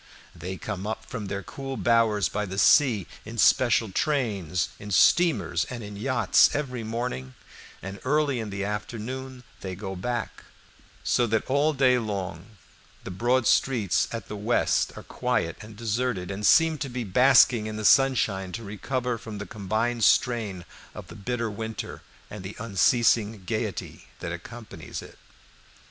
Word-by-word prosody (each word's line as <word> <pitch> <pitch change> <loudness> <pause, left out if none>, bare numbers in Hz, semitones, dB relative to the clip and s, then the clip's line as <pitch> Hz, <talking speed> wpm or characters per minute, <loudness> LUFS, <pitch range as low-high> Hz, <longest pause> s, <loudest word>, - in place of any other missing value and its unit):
They 90 +3 -6
come 100 0 -5
up 110 - -4
from 115 -6 -6
their 100 0 -4
cool 135 +3 -6
bowers 115 -5 +3
by 105 +2 -3
the 95 +1 -6
sea, 115 - +5 0.2
in 115 +2 -9
special 115 -2 +4
trains, 100 - 0
in 105 - -8
steamers, 95 - +3
and 120 -3 -7
in 105 0 -8
yachts, 130 +6 +4
every 130 -5 -3
morning, 110 - -4 0.5
and 95 +1 -7
early 140 -1 +1
in 110 -2 -4
the 100 0 -3
afternoon 125 +5 -5 0.2
they 95 -1 -5
go 95 0 -6
back, 120 +5 -4 0.6
so 120 - +2
that 110 0 0
all 140 +3 +2
day 130 -2 +4
long 100 -2 -5 0.5
the - - -6
broad 120 +6 +1
streets 115 -9 +2
at 115 -4 -5
the 105 - -6
west 110 +4 +1
are - - -9
quiet 80 - -1
and 105 0 -11
deserted, 115 -4 -2
and 100 +2 -1
seem 160 -2 +5
to 135 - -3
be 125 0 -4
basking 120 +1 +5
in 110 - -5
the 110 0 -4
sunshine 110 -8 +3
to 115 - -5
recover 120 +4 -3
from 110 -1 -8
the 100 - -5
combined 110 +4 -2
strain 110 -9 +2 0.3
of - - -9
the - - -10
bitter 115 +1 -3
winter 110 +2 -6 0.3
and 105 -3 -9
the 95 +2 -7
unceasing 110 0 +2
gayety 110 0 -4
that 85 - -5
accompanies 85 -1 -8
it. - - -14
110 Hz, 160 wpm, -26 LUFS, 100-125 Hz, 0.6 s, sea